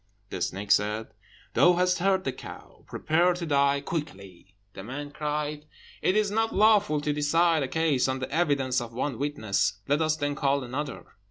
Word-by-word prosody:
The 90 Hz, -, -5 dB
snake 100 Hz, +3 st, -3 dB
said, 105 Hz, +2 st, +1 dB, 0.4 s
"Thou 175 Hz, -, +5 dB
hast 180 Hz, +1 st, +1 dB
heard 190 Hz, +1 st, +2 dB
the 135 Hz, -, -1 dB
cow; 130 Hz, -, -12 dB
prepare 175 Hz, +3 st, +1 dB
to 175 Hz, -1 st, -5 dB
die 140 Hz, -2 st, +2 dB
quickly." 100 Hz, -, -7 dB, 0.2 s
The 95 Hz, -, -9 dB
man 145 Hz, +6 st, -6 dB
cried, 150 Hz, 0 st, -3 dB, 0.3 s
"It 185 Hz, -, +2 dB
is 210 Hz, -1 st, +1 dB
not 225 Hz, +1 st, 0 dB
lawful 205 Hz, -7 st, +4 dB
to 150 Hz, 0 st, -1 dB
decide 160 Hz, +2 st, +2 dB
a 135 Hz, -, -1 dB
case 155 Hz, -4 st, +1 dB
on 130 Hz, 0 st, -1 dB
the 130 Hz, -, -5 dB
evidence 140 Hz, -6 st, +1 dB
of 120 Hz, -1 st, -8 dB
one 130 Hz, 0 st, -3 dB
witness, 140 Hz, -8 st, 0 dB
let 145 Hz, +3 st, +1 dB
us 155 Hz, 0 st, +2 dB
then 145 Hz, -2 st, -2 dB
call 140 Hz, -1 st, 0 dB
another." 135 Hz, +3 st, -5 dB
145 Hz, 180 wpm, -27 LUFS, 130-165 Hz, 0.4 s, Thou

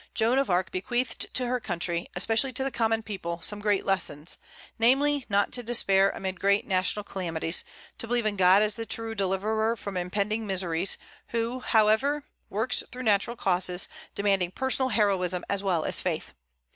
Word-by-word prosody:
Joan 235 Hz, +4 st, +3 dB
of 275 Hz, -, 0 dB
Arc 180 Hz, +1 st, +1 dB
bequeathed 240 Hz, +7 st, -2 dB
to 250 Hz, -, +1 dB
her 250 Hz, +1 st, 0 dB
country, 175 Hz, -6 st, -2 dB
especially 225 Hz, +8 st, +2 dB
to 265 Hz, +2 st, 0 dB
the 270 Hz, -, -2 dB
common 225 Hz, -1 st, 0 dB
people, 180 Hz, -5 st, -5 dB
some 210 Hz, -, +1 dB
great 205 Hz, -1 st, +1 dB
lessons; 175 Hz, -5 st, -1 dB, 0.4 s
namely, 275 Hz, +4 st, +3 dB
not 200 Hz, 0 st, +2 dB
to 245 Hz, -, 0 dB
despair 195 Hz, -5 st, +3 dB
amid 190 Hz, -2 st, -4 dB
great 200 Hz, +1 st, +2 dB
national 190 Hz, +2 st, 0 dB
calamities; 165 Hz, -4 st, -1 dB, 0.4 s
to 230 Hz, -, -4 dB
believe 240 Hz, -1 st, 0 dB
in 210 Hz, -1 st, +1 dB
God 190 Hz, +2 st, +5 dB
as 215 Hz, +1 st, -1 dB
the 225 Hz, 0 st, -5 dB
true 225 Hz, 0 st, -1 dB
deliverer 215 Hz, +3 st, 0 dB
from 200 Hz, -4 st, -6 dB
impending 205 Hz, +5 st, -1 dB
miseries, 185 Hz, -2 st, 0 dB, 0.3 s
who, 235 Hz, +2 st, -2 dB
however, 235 Hz, +6 st, +2 dB, 0.3 s
works 225 Hz, +5 st, +1 dB
through 255 Hz, +1 st, -6 dB
natural 215 Hz, +1 st, +2 dB
causes, 180 Hz, -3 st, +1 dB, 0.3 s
demanding 195 Hz, -3 st, +1 dB
personal 260 Hz, +5 st, 0 dB
heroism 190 Hz, -5 st, +1 dB
as 200 Hz, -1 st, -1 dB
well 180 Hz, -5 st, 0 dB
as -, -, +3 dB
faith. -, -, -3 dB
205 Hz, 170 wpm, -27 LUFS, 185-230 Hz, 0.4 s, God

